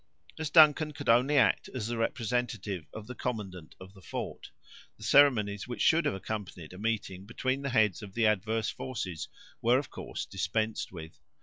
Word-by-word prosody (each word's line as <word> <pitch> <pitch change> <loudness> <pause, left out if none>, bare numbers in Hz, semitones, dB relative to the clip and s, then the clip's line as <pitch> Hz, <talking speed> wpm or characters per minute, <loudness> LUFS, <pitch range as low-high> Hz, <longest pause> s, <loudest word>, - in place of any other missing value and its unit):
As 155 -1 -2
Duncan 155 -1 +6
could - - -5
only 125 +5 +4
act 115 -6 +3
as 120 -5 -2
the 120 +1 -2
representative 115 -5 -2
of 110 - -8
the 125 - -7
commandant 100 -10 -5
of 95 +1 -12
the 95 - -16
fort, - - -6 0.5
the - - -13
ceremonies 105 -9 +4
which 120 - -3
should 165 +1 +4
have - - +1
accompanied 95 -5 -6
a 90 - -10
meeting 100 -3 -3
between 130 +4 -1
the 140 - -2
heads 110 -7 +2
of 100 -2 -10
the 115 -1 +2
adverse 110 +1 +1
forces 100 -10 -5 0.3
were, 120 +2 +4
of 140 0 -4
course, - - -6
dispensed 110 0 -2
with. 80 -2 -10
110 Hz, 180 wpm, -30 LUFS, 95-125 Hz, 0.5 s, Duncan